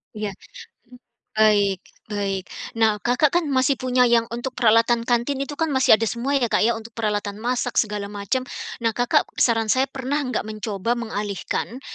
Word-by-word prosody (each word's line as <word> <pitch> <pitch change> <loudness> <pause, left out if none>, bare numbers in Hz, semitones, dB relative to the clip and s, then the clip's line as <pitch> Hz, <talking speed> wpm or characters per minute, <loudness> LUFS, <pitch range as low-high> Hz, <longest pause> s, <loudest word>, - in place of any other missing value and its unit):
Iya, 210 -1 -3 0.6
mhm. 250 - -14 0.4
Baik, 205 -3 +3 0.3
baik. 195 -2 -2 0.3
Nah, 220 -2 +2
Kakak 250 +7 +2
kan 350 -1 +2
masih 265 0 +3
punya 255 -1 +2
yang 235 -1 +3
untuk 240 +3 -4
peralatan 230 0 +3
kantin, 240 +3 0
itu 285 +1 -5
kan 325 - +1
masih 260 -4 +5
ada 225 - -1
semua 250 +5 0
ya, 250 - +1
Kak, 230 - +1
ya, 230 +1 +2
untuk 225 +1 -11
peralatan 210 -2 -2
masak 245 +1 -1
segala 210 -2 -4
macem. 205 +5 -3 0.4
Nah, 225 - +2
Kakak 245 +1 +2 0.2
saran 225 -2 +3
saya 260 +5 +2
pernah 270 +2 -2
nggak 255 -5 -2
mencoba 215 0 -2
mengalihkan, 220 +1 -4
235 Hz, 170 wpm, -23 LUFS, 215-255 Hz, 0.6 s, masih